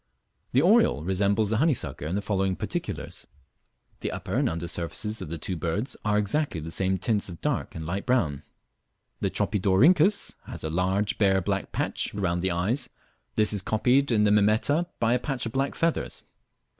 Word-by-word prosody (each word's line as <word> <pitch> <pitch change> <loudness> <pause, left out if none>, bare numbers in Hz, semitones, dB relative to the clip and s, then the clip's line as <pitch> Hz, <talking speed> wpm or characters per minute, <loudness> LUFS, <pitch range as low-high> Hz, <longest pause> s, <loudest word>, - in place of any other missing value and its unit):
The 130 +4 +4
oriole 205 - +4
resembles 100 +3 +1
the 110 - +2
honeysucker 140 - 0
in 85 - -2
the 100 - -2
following 95 -2 0
particulars: - - -5 0.7
the - - -3
upper - - -5
and - - +2
under 85 +1 -4
surfaces 85 +6 -3
of - - -6
the 85 - -4
two 90 +4 -4
birds 90 - -2
are 105 -1 +2
exactly 105 - 0
of 80 - -5
the 80 - -6
same 95 +2 +1
tints 100 +1 -1
of 85 -2 -9
dark - - -2
and 80 - -5
light 95 +8 -4
brown; 80 - +1 0.8
the - - 0
Tropidorhynchus 145 - +3
has - - -7
a 80 - -3
large 95 +4 0
bare 95 -2 +4
black 90 - -2
patch - - -1
round 90 -3 0
the 95 - 0
eyes; 95 +10 0 0.5
this 105 -1 +3
is 100 - +2
copied 125 +7 +2
in 105 -2 +3
the 105 - +4
Mimeta 110 +11 +3
by 115 0 +2
a 125 - +2
patch 135 -2 -2
of 115 - -3
black 135 +3 -1
feathers. 165 -1 -1
105 Hz, 185 wpm, -26 LUFS, 90-125 Hz, 0.8 s, The